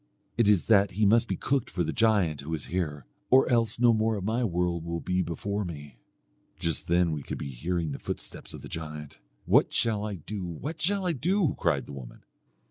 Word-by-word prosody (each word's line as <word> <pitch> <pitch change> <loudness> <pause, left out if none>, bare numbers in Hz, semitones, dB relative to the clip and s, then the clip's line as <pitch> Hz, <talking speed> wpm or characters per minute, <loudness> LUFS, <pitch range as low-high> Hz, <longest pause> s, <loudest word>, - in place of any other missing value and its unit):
'It 115 -2 +3
is 100 -5 +4
that 100 -3 +5
he 110 - +4
must 115 +3 +4
be - - -1
cooked 135 -3 0
for 90 - -1
the 80 0 -2
giant 100 -10 +2
who 75 +3 -7
is 75 - -5
here, 75 -7 -2 0.2
or 130 +1 +6
else 115 -3 +2
no 120 -1 +6
more 110 0 +1
of 100 - -4
my 115 +5 0
world 90 -4 0
will 85 0 -3
be 90 +2 0
before 100 +5 -2
me.' 75 -8 -8 0.6
Just 85 -2 -1
then 85 0 +3
we 75 -2 -3
could - - -5
be 70 - -5
hearing 85 +5 -2
the 70 - -5
footsteps - - -5
of - - -11
the - - -7
giant, 75 -4 -7 0.3
'What - - +4
shall 110 -3 +1
I 105 -1 -3
do? 95 +4 -6
what 135 - -5
shall 195 +2 +1
I 180 - +2
do?' 170 +4 +1
cried 70 -7 +1
the - - -10
woman. 65 -3 -10
90 Hz, 215 wpm, -28 LUFS, 80-115 Hz, 0.6 s, or